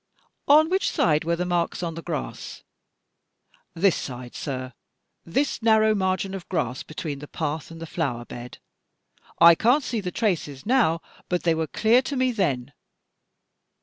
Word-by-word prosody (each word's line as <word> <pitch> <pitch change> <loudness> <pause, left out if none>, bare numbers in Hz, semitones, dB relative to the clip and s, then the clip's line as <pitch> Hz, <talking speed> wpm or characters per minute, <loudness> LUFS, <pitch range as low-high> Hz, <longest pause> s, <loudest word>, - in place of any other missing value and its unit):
" - - -51
On 310 +1 +4
which 380 +3 +1
side 155 -1 +2
were 170 +1 +1
the 180 +1 -2
marks 175 0 -1
on 165 -1 -2
the 165 - -7
grass?" 160 -4 -6 1.1
"This 185 0 +3
side, 125 -2 -6
sir. 130 -3 -5 0.5
This 270 +13 0
narrow 220 -1 +4
margin 190 -1 -1
of 190 -3 -7
grass 130 -8 -1
between 155 -2 -6
the 150 - -9
path 155 0 -4
and 165 0 -10
the 165 - -6
flower 135 -8 -3
bed. 120 0 -9 0.8
I 170 0 +9
can't 245 - +3
see 230 -4 -2
the 185 - -3
traces 170 - -2
now, 220 -9 +3 0.3
but 180 -1 0
they 165 - +3
were 160 0 -1
dear 230 +3 +4
to 275 +2 -4
me 255 -1 +2
then." 145 - -1
170 Hz, 165 wpm, -25 LUFS, 150-215 Hz, 1.1 s, I